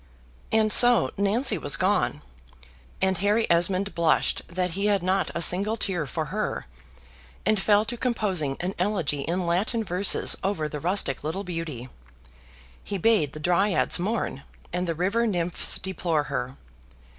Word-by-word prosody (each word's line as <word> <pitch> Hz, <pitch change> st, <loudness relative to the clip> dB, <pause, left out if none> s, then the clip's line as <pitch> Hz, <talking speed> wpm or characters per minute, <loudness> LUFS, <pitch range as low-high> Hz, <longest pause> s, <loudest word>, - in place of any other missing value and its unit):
And 220 Hz, -1 st, +3 dB
so 245 Hz, -1 st, +6 dB
Nancy 205 Hz, +2 st, +1 dB
was 145 Hz, -, +2 dB
gone; 185 Hz, -5 st, 0 dB, 0.8 s
and 190 Hz, -1 st, +1 dB
Harry 210 Hz, +3 st, +2 dB
Esmond 185 Hz, +4 st, +1 dB
blushed 170 Hz, -2 st, +1 dB
that 180 Hz, +1 st, -2 dB
he 200 Hz, +4 st, -1 dB
had 200 Hz, -3 st, +1 dB
not 190 Hz, +1 st, 0 dB
a 170 Hz, -, +1 dB
single 200 Hz, +6 st, +2 dB
tear 180 Hz, -8 st, -2 dB
for 160 Hz, +3 st, -3 dB
her, 215 Hz, 0 st, -3 dB, 0.8 s
and 215 Hz, 0 st, +2 dB
fell 210 Hz, +1 st, +3 dB
to 240 Hz, +2 st, -2 dB
composing 195 Hz, -, -1 dB
an 180 Hz, +2 st, -3 dB
elegy 180 Hz, -7 st, 0 dB
in 175 Hz, +5 st, -2 dB
Latin 200 Hz, +7 st, 0 dB
verses 185 Hz, 0 st, +3 dB
over 190 Hz, -6 st, -1 dB
the 150 Hz, 0 st, -6 dB
rustic 170 Hz, -5 st, 0 dB
little 160 Hz, +6 st, -3 dB
beauty. 165 Hz, -9 st, -5 dB, 1.0 s
He 200 Hz, -, -4 dB
bade 185 Hz, -8 st, +2 dB
the 155 Hz, -, -8 dB
dryads 180 Hz, +2 st, +1 dB
mourn 195 Hz, -, -2 dB, 0.3 s
and 180 Hz, 0 st, -2 dB
the 165 Hz, -, -2 dB
river 200 Hz, +8 st, 0 dB
nymphs 175 Hz, -4 st, 0 dB
deplore 175 Hz, -5 st, -2 dB
her. 130 Hz, -2 st, -5 dB
185 Hz, 150 wpm, -25 LUFS, 165-205 Hz, 1.0 s, so